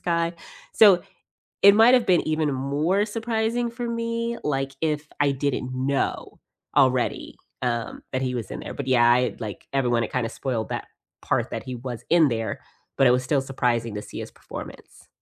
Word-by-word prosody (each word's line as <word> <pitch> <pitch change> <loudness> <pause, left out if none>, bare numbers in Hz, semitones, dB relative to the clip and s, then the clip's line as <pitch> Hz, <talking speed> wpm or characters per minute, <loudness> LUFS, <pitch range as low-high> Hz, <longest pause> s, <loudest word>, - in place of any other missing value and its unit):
guy." 170 0 0 0.4
So, 200 -5 +6 0.6
It 200 0 +9
might 225 +3 +7
have 250 -2 +4
been 180 -2 +3
even 155 -2 +1
more 150 +10 0
surprising 230 +2 -1
for 235 +1 -5
me, 230 0 -2
like, 135 -2 -1
if 150 -1 -1
I 145 -1 +3
didn't 135 -2 -2
know 135 +2 -2 0.4
already, 130 -3 +2 0.3
um, 120 -2 -2
that 130 0 -1
he 125 -1 -1
was 115 -6 -4
in - - -6
there, - - -7
but 140 - -6
yeah, 120 -2 +5
I 125 +1 +2
like 105 -4 -7
everyone, 120 -4 +1
it - - -5
kinda 125 -3 0
spoiled 120 -5 -3
that - - -4 0.3
part - - -1
that - - -3
he 130 -1 -6
was 120 -1 -6
in 165 -4 +5
there, 115 -1 -3 0.4
but 135 - +4
it 125 - +7
was 125 +1 +2
still 135 +1 +1
surprising 120 -4 -1
to 105 - -4
see - - -10
his - - -8
performance. - - -11
135 Hz, 185 wpm, -24 LUFS, 125-185 Hz, 0.6 s, It